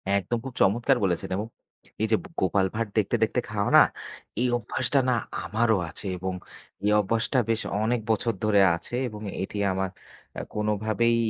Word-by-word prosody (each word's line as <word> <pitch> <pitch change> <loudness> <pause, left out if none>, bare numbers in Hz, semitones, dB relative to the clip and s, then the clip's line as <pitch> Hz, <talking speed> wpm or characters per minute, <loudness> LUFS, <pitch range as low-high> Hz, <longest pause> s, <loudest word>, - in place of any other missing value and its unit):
একদম, 100 +5 0
খুব 135 - -6
চমৎকার 120 +7 +3
বলেছেন 90 -3 0
এবং 105 +3 -3 0.5
এইযে 110 0 +3
ব - - -12
গোপাল 95 +1 +2
ভাঁড় 115 -1 -1
দেখতে, - - +2
দেখতে - - +1
খাওয়া - - 0
না, - - +11 0.6
এই 125 - +2
অভ্যাসটা 125 +4 0
না 125 - +4 0.3
আমারও 110 -1 +2
আছে - - -8
এবং 95 +1 -3 0.5
এই 105 - +3
অভ্যাসটা 115 +5 0
বেশ 115 0 +1 0.2
অনেক 115 +2 +1
বছর 115 +1 +1
ধরে 105 -1 +4 0.2
আছে 90 +7 -10
এবং 105 -3 -8 0.2
এটি 95 - -4
আমার 95 0 -1 0.5
আ - - -2
কোনভাবেই 105 +2 +1
110 Hz, 165 wpm, -26 LUFS, 100-115 Hz, 0.6 s, না